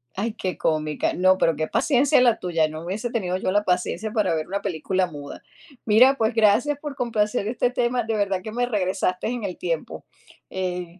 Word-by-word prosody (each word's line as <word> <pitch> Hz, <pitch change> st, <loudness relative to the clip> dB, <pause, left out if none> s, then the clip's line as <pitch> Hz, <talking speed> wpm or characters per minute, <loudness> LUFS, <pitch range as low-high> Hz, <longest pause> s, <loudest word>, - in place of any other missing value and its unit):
Ay, 215 Hz, +3 st, -2 dB
qué 185 Hz, -5 st, -4 dB
cómica. 155 Hz, -1 st, -1 dB
No, 185 Hz, +1 st, +3 dB
pero 165 Hz, -4 st, +2 dB
qué 155 Hz, 0 st, -2 dB
paciencia 270 Hz, -2 st, +3 dB
la 235 Hz, -3 st, +3 dB
tuya, 165 Hz, -3 st, +1 dB
no 155 Hz, +1 st, -7 dB
hubiese 210 Hz, +7 st, -3 dB
tenido 185 Hz, -5 st, -1 dB
yo 185 Hz, -, -1 dB
la 205 Hz, +1 st, +2 dB
paciencia 185 Hz, +4 st, -1 dB
para 205 Hz, -7 st, +1 dB
ver 155 Hz, -, -3 dB
una 200 Hz, +2 st, -3 dB
película 185 Hz, +1 st, -1 dB
muda. 145 Hz, -3 st, -9 dB, 0.4 s
Mira, 250 Hz, +6 st, +5 dB
pues, 225 Hz, 0 st, +1 dB
gracias 225 Hz, +6 st, +3 dB
por 290 Hz, -2 st, -6 dB
complacer 215 Hz, -3 st, -1 dB
este 245 Hz, +1 st, 0 dB
tema, 245 Hz, -1 st, 0 dB
de 225 Hz, 0 st, -2 dB
verdad 195 Hz, -3 st, 0 dB
que 215 Hz, -, -7 dB
me 245 Hz, +2 st, 0 dB
regresaste 190 Hz, -4 st, -1 dB
en 240 Hz, -2 st, -3 dB
el 185 Hz, -3 st, -4 dB
tiempo, 155 Hz, -, -4 dB, 0.4 s
eh 180 Hz, -1 st, -4 dB
200 Hz, 195 wpm, -23 LUFS, 180-230 Hz, 0.4 s, Mira